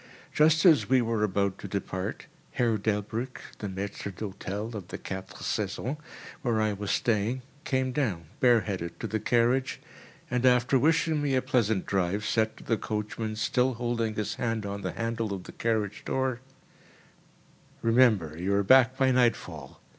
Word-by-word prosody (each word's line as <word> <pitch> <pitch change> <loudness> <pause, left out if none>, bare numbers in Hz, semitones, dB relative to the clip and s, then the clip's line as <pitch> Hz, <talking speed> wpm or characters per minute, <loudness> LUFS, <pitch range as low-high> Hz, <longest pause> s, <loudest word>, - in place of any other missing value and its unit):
Just 155 +2 +4
as 160 -8 +6
we 130 0 +5
were 115 -2 0
about 100 -1 0
to - - -6
depart, 95 0 -4 0.3
Herr 120 -3 +2
DelbrĂĽck 110 +5 -2 0.2
(the 105 - -4
maître 100 +1 -5
d'hĂ´tel 100 +3 -5
of 100 -5 -6
the - - -6
Quatre 95 0 -7
Saisons, 110 +6 -2 0.5
where 120 -6 +1
I 110 -1 +1
was 100 0 -5
staying) 115 +4 0 0.2
came 130 -1 0
down, 110 - -1
bareheaded, 100 -8 +2
to - - -4
the 110 - -1
carriage 120 +4 +1 0.5
and, 125 0 0
after 125 +1 +4
wishing 160 +1 +2
me 140 -2 +1
a 130 - +3
pleasant 115 -7 +1
drive, 95 +2 0
said 110 +1 +1
to - - -12
the 115 - 0
coachman, 110 +1 -3
still 125 +3 +1
holding 115 -2 -1
his 105 -1 -2
hand 115 -3 -1
on 100 0 -4
the 95 -3 -3
handle 115 -1 -2
of 95 - -8
the - - -10
carriage 110 -3 -1
door: 130 -2 -1 1.4
"Remember 115 -9 +4
you 95 +4 0
are 100 - +2
back 130 +4 +5
by 130 -1 +3
nightfall. 115 - 0
110 Hz, 160 wpm, -28 LUFS, 100-125 Hz, 1.4 s, as